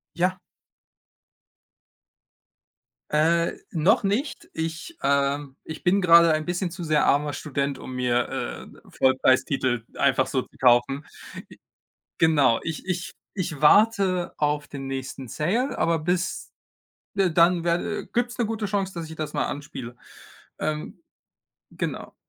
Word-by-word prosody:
Ja. 180 +1 +1 2.7
Äh, 165 +3 +2 0.2
noch 165 +5 +3
nicht. 215 +9 -2
Ich, 165 - -5
ähm 140 0 0
ich 160 - -8
bin 190 +2 +3
grade 170 -1 +7
ein 155 0 0
bisschen 175 +1 -2
zu 175 0 -7
sehr 155 -1 +2
armer 145 +1 +2
Student, 140 -1 -3
um 130 - -8
mir, 125 -1 +1 0.5
äh, - - -19
Vollpreistitel 130 -2 +2
einfach - - +2
so - - -1
zu - - -19
kaufen. 125 +3 +3 1.2
G 160 - +5
Genau, 140 -7 +3
ich 160 +1 -5
ich 180 -1 -3 0.2
ich 165 -6 -4
warte 190 0 +4
auf 150 0 0
den 135 -1 -6
nächsten 135 -1 -5
Sale, 215 - -1
aber 165 -1 +1
bis, 180 +3 -2 0.7
äh, 190 -3 +3
dann 170 +1 +4
werde 175 +5 -1
gibt's 240 +1 -2
'ne 235 - +1
gute 220 -1 -3
Chance, 195 -2 -2
dass 165 -2 -6
ich 160 - -9
das 155 -1 -4
mal - - 0
anspiele, 135 -4 -7 0.6
ähm 155 - -3 0.7
genau. - - -5
160 Hz, 130 wpm, -25 LUFS, 140-180 Hz, 2.7 s, grade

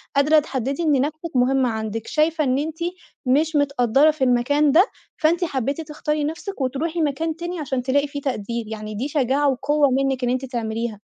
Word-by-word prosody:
قادرة 300 +3 +5
تحدِّدي 275 +2 -3
إن 290 -4 +3
نفسِك 310 +2 -4
مهمة 255 0 +3
عندِك، 220 0 -4
شايفة 310 0 +1
إن 260 -1 +1
أنتِ 315 +2 -4 0.5
مش 300 +5 +2
متقدرّة 280 0 +3
في 300 -3 -3
المكان 270 +4 +3
ده، 350 +7 +6 0.3
فأنتِ 335 +3 +2
حبيتِ 275 0 -2
تختاري 300 -1 -2
نفسِك 320 +2 -4
وترُوحي 310 +6 -1
مكان 315 +2 -1
تاني، 345 0 -5
عشان 265 -4 -2
تلاقي 285 +3 +1
في 285 0 -5
تقدير 235 -3 -3
يعني 215 -1 -6
دي 255 +7 -2
شجاعة 280 0 +1
وقوة 285 +2 +2
منِّك 265 -1 0
إن 245 - +1
أنتِ 255 +2 -1
تعمليها. 230 -3 -3
280 Hz, 180 wpm, -22 LUFS, 250-305 Hz, 0.5 s, ده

